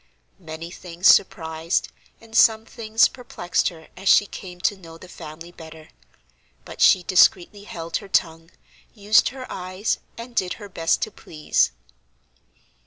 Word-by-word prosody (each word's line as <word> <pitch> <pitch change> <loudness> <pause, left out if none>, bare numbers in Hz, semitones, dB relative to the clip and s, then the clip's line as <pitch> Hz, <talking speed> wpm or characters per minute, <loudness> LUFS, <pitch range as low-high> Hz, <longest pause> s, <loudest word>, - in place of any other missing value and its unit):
Many 165 -1 -8
things 175 0 -9
surprised, 160 -2 +3 0.3
and 225 0 -14
some 220 -1 +5
things 225 -1 +2
perplexed 210 -8 -2
her, 160 -2 -15
as 190 - -2
she 205 - +6
came 180 -3 -10
to 205 - +1
know 165 -4 -13
the 185 - -13
family 165 0 -11
better. 160 -2 -13 0.8
But - - -9
she 185 - +6
discreetly 185 +2 +3
held 165 -4 -5
her 200 - -10
tongue, 165 -3 0 0.5
used 210 0 +3
her 260 0 -9
eyes, 185 +3 -3 0.2
and 235 +1 -9
did 185 -4 0
her 205 -2 -11
best 165 +1 0
to 215 - -4
please. 155 - -1
180 Hz, 145 wpm, -23 LUFS, 165-210 Hz, 0.8 s, she